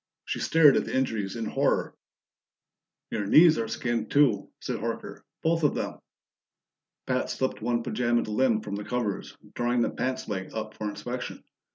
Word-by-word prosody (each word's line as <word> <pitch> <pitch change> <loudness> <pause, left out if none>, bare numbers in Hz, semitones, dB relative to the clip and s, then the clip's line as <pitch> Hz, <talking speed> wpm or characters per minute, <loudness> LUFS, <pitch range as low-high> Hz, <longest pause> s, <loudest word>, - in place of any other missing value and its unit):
She - - -3
stared 155 -4 +6
at - - 0
the - - -2
injuries 110 -6 -1
in 115 -1 -3
horror. - - 0 1.2
"Your 105 -2 -2
knees 160 - +7
are 115 - -1
skinned, 115 -1 -2
too," 135 -9 +3
said - - -3
Horker. - - -5 0.2
"Both 165 +1 +2
of 145 - +3
them." - - -3 1.1
Pat 130 0 0
slipped 130 -3 -2
one 120 +1 0
pajamaed 120 -1 0
limb 110 0 +2
from 100 -1 -5
the 105 - -4
covers, 110 -2 -3 0.2
drawing 120 0 +1
the - - 0
pants 130 0 -3
leg 95 -1 -4
up 110 -1 -4
for 105 -1 -4
inspection. 120 +4 -6
120 Hz, 165 wpm, -27 LUFS, 110-130 Hz, 1.2 s, knees